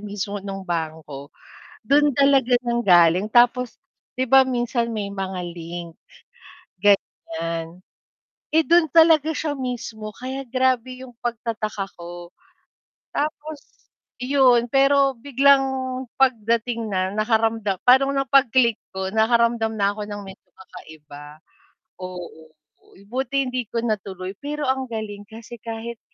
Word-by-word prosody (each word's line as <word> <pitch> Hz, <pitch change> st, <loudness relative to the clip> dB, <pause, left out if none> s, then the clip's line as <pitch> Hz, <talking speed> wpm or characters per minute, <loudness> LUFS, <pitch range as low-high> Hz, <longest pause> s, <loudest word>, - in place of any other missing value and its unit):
mismo 205 Hz, -1 st, -5 dB
ng 195 Hz, -1 st, -7 dB
bangko, 155 Hz, -5 st, -5 dB, 0.5 s
dun 285 Hz, +3 st, +3 dB
talaga 275 Hz, -3 st, +3 dB
nang 240 Hz, -2 st, -2 dB
galing. 175 Hz, +2 st, +5 dB
Tapos, 240 Hz, +1 st, +3 dB, 0.4 s
'di 255 Hz, -, -1 dB
ba 265 Hz, -1 st, +7 dB
minsan 240 Hz, -2 st, -1 dB
may 200 Hz, -2 st, -3 dB
mga 190 Hz, -2 st, -4 dB
link, 170 Hz, 0 st, -8 dB, 0.9 s
ganyan. 165 Hz, -4 st, -1 dB, 0.7 s
Eh 320 Hz, 0 st, +2 dB
dun 335 Hz, -3 st, +4 dB
talaga 320 Hz, -2 st, +5 dB
siya 300 Hz, -1 st, -3 dB
mismo 245 Hz, -5 st, -5 dB
kaya 260 Hz, +5 st, -6 dB
grabe 255 Hz, 0 st, 0 dB
yung 245 Hz, -, -16 dB
pagtataka 225 Hz, -4 st, -3 dB
ko. 175 Hz, 0 st, -9 dB, 0.8 s
Tapos 305 Hz, 0 st, -6 dB, 0.2 s
yun, 250 Hz, -2 st, +3 dB
pero 275 Hz, 0 st, +4 dB
biglang 275 Hz, +1 st, +4 dB, 0.5 s
pagdating 230 Hz, -2 st, +1 dB
na 190 Hz, -2 st, -1 dB
nakaramdam 220 Hz, -1 st, 0 dB
parang 270 Hz, +2 st, +5 dB
nung 275 Hz, -1 st, -2 dB
pag-click 250 Hz, -4 st, +4 dB, 0.2 s
ko 190 Hz, 0 st, -3 dB
nakaramdam 225 Hz, 0 st, +2 dB
na 200 Hz, -1 st, +1 dB
ako 205 Hz, 0 st, -6 dB
ng 205 Hz, 0 st, -7 dB
medyo 190 Hz, 0 st, -13 dB
kakaiba. 150 Hz, -4 st, -13 dB, 0.6 s
Oo, 180 Hz, -3 st, -9 dB, 0.6 s
buti 270 Hz, +2 st, 0 dB
hindi 250 Hz, -3 st, -4 dB
ko 230 Hz, 0 st, -3 dB
natuloy. 190 Hz, -4 st, -4 dB
Pero 295 Hz, +1 st, -4 dB
ang 265 Hz, 0 st, -1 dB
galing 210 Hz, -3 st, -6 dB
kasi 225 Hz, +1 st, -11 dB
kahit 230 Hz, +1 st, -7 dB
230 Hz, 120 wpm, -22 LUFS, 195-260 Hz, 0.9 s, ba